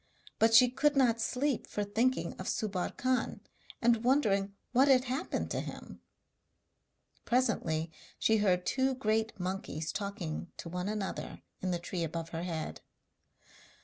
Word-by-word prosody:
But 225 0 +5
she 250 +2 +9
could 290 +4 +2
not 240 -4 +3
sleep 265 +2 0
for 210 - -2
thinking 235 +6 0
of - - -5
Subbar 195 -4 -2
Khan, 255 0 0 0.4
and 230 -1 +4
wondering 205 -7 +2 0.2
what 260 +3 +5
had 260 -2 +6
happened 265 +6 -2
to - - 0
him. - - -8 1.2
Presently 195 -10 +1 0.3
she 220 - +3
heard 185 -4 +2
two 265 0 +1
great 220 -3 0
monkeys 180 -4 -3
talking 185 -5 -4
to 170 - -7
one 180 +3 -3
another 210 -2 -4 0.2
in 185 - -1
the 175 - +1
tree 175 0 -4
above 165 +1 -4
her 165 0 -4
head. 165 -3 -4
215 Hz, 145 wpm, -32 LUFS, 180-250 Hz, 1.2 s, she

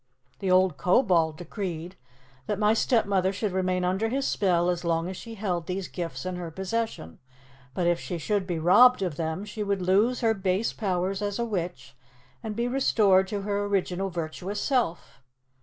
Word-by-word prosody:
The 195 - -2
old 185 -4 +4
Kobold 175 - +2
decreed 175 -1 -5 0.5
that 210 - -1
my 210 0 +3
stepmother 200 -5 +2
should 200 +1 -2
remain 185 -1 0
under 190 +5 0
his 270 +3 -1
spell 180 -3 +2
as 175 0 -4
long 165 0 0
as 190 - -5
she 230 +4 -9
held 180 -5 -2
these 185 0 -3
gifts 175 0 -5
in 185 -1 -3
her 175 -2 -5
possession; 190 - -4 0.6
but 180 - 0
if 170 0 +2
she 175 - -4
should 195 +3 -1
be 175 -3 -2
robbed 200 +8 +6
of 175 -6 -2
them, 160 +5 -3
she 210 +1 -7
would 200 -2 -1
lose 205 +7 +2
her 225 -2 +3
base 195 +1 -1
powers 190 -1 -1
as 205 -1 -2
a 235 - -1
witch 170 - -4 0.5
and 220 -2 -5
be 235 +2 0
restored 210 -7 +3
to 200 +1 -3
her 205 0 -1
original 195 -1 -1
virtuous 175 +4 -4
self." 240 - -1
190 Hz, 180 wpm, -27 LUFS, 175-210 Hz, 0.6 s, robbed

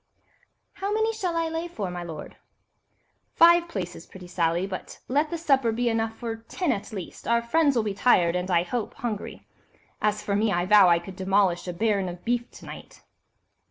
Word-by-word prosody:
"How 395 +1 -4
many 440 +1 +1
shall 365 -6 -2
I 330 0 +1
lay 325 +1 -3
for, 205 - -5
my 175 0 -5
lord?" 165 -3 -8 1.0
"Five 340 +1 +6
places, 180 - -6
pretty 185 -1 -12
Sally, 175 0 0
but 190 -1 -7
let 295 +4 +1
the 340 - -3
supper 270 -7 +2
be 240 +2 0
enough 225 0 -1
for 230 -2 -4
ten 270 +8 -2
at 210 0 -4
least—our 230 +4 -2
friends 290 +3 +2
will 230 - +2
be 210 -2 -2
tired, 185 -5 +3
and, 180 +1 -2
I 170 -2 +3
hope, 225 +5 -4
hungry. 220 -4 -5 0.6
As 210 0 0
for 200 - -1
me, 215 +1 +2
I 175 -1 +1
vow 200 -1 +7
I 170 - +5
could 180 +2 -8
demolish 190 -1 +1
a - - -2
baron 200 0 0
of 175 0 -10
beef 240 +1 0
to - - -14
night." - - -11
215 Hz, 195 wpm, -26 LUFS, 185-265 Hz, 1.0 s, vow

